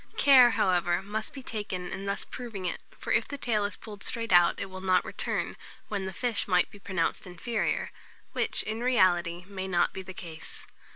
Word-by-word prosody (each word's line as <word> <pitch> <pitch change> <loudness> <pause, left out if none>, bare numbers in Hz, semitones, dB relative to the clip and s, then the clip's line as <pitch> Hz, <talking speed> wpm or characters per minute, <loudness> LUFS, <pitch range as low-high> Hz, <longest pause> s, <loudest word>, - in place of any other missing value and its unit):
Care, 260 -4 +8
however, 180 -4 +2
must 215 +2 -4
be 270 - -9
taken 200 -6 -4
in 195 +1 -5
thus 200 - -2
proving 225 -7 -6
it; 180 - -2 0.2
for - - -2
if - - +2
the 285 - -5
tail 220 -6 0
is 205 - -3
pulled 205 -3 -10
straight 230 -4 -1
out, 175 -1 +6
it - - -2
will 185 0 -8
not 185 -1 +3
return; - - -2 0.3
when 200 -2 -2
the 190 - -3
fish 230 +3 +1
might 180 -2 +3
be 205 - -13
pronounced 185 -3 -2
inferior, 210 +6 -2 0.4
which, - - 0
in 220 +1 -3
reality, 180 -8 +2
may 190 -1 -5
not 175 -2 +2
be 190 - -5
the 190 - -9
case. 165 -3 -8
195 Hz, 195 wpm, -29 LUFS, 180-220 Hz, 0.4 s, Care